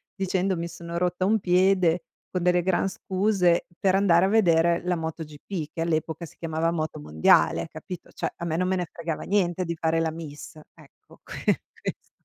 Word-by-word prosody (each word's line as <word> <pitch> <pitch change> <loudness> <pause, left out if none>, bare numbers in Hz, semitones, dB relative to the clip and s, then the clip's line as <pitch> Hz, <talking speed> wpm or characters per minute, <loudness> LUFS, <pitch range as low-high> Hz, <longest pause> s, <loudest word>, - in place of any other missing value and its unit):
dicendo: 190 -1 0
"Mi 170 - -3
sono 170 0 -7
rotta 180 +1 0
un 215 +2 +3
piede", 180 -2 +3 0.3
con 185 - -1
delle 180 0 +3
gran 190 +1 +1
scuse 185 -3 +1
per 190 -2 +3
andare 190 -3 +4
a - - +2
vedere 170 -5 +3
la 180 0 +1
MotoGP, 160 0 -5
che 165 - -4
all'epoca 160 0 -1
si - - -15
chiamava 165 0 -1
Motomondiale, 80 - +2
capito, 180 -3 -9
cioè, - - -4
a 170 - -6
me 160 - -1
non 185 +1 +1
me 190 - +1
ne 180 -1 -2
fregava 165 -2 -4
niente 185 -3 +1
di 170 0 -3
fare 165 0 +1
la 165 - +1
miss, 155 -3 -9 0.2
ecco, - - -20
que - - -1 0.2
questo. - - -6
170 Hz, 180 wpm, -26 LUFS, 165-185 Hz, 0.3 s, andare